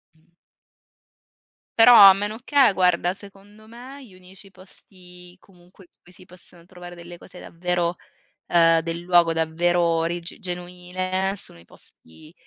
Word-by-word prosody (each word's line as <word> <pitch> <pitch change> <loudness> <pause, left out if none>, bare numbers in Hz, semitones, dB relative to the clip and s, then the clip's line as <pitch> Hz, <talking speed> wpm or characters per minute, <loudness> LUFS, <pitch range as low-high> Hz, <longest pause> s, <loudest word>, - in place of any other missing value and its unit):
Mh. 160 - -31 1.6
Però 235 +2 +7
a 200 -3 +9
meno 205 +3 -5
che 275 -4 +3
guarda, 180 -1 0
secondo 200 +2 -18
me 255 +4 -13
gli 205 - -19
unici 185 +2 -17
posti 180 -1 -18
comunque 180 0 -22
in - - -48
cui 175 - -21
si 185 0 -17
possono 175 -1 -20
trovare 175 -1 -13
delle 175 0 -13
cose 180 - -15
davvero, 175 0 -4 0.5
ehm, 165 -1 +3
del 165 +1 -6
luogo, 175 -1 +2
davvero 165 +2 -1
origi 170 +1 -3
genuine 185 +1 -5
sono 135 - -5
i 85 - -19
posti, 85 - -21
180 Hz, 140 wpm, -21 LUFS, 170-195 Hz, 1.6 s, a